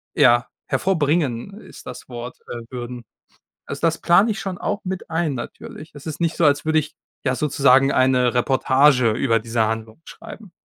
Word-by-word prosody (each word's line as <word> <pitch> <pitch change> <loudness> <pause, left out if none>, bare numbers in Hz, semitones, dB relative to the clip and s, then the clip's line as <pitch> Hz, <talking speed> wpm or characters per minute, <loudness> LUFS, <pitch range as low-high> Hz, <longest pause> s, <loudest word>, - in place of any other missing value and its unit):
ja, 120 +2 +4 0.2
hervorbringen 160 - 0
ist - - -14
das - - -9
Wort, 120 0 -8
äh, 120 - -5
würden. 120 -1 -6 0.6
Also, 140 - -7
das 165 -1 +1
plane 190 +6 +4
ich 210 - -4
schon 190 -1 -4
auch 205 +2 -2
mit 185 -3 -6
ein 160 -3 0
natürlich. 150 +5 -9
Es 145 +1 -11
ist 155 - -5
nicht 170 -1 0
so, - - 0
als 145 -1 +3
würde 160 0 +3
ich, 155 +1 -7 0.3
ja, 130 -2 0
sozusagen 135 -1 +3
eine 130 -2 +3
Reportage 130 0 +3
über 115 +1 +1
diese 115 +1 -2
Handlung 110 +4 -5
schreiben. 205 -5 -12
140 Hz, 175 wpm, -21 LUFS, 120-165 Hz, 0.6 s, ja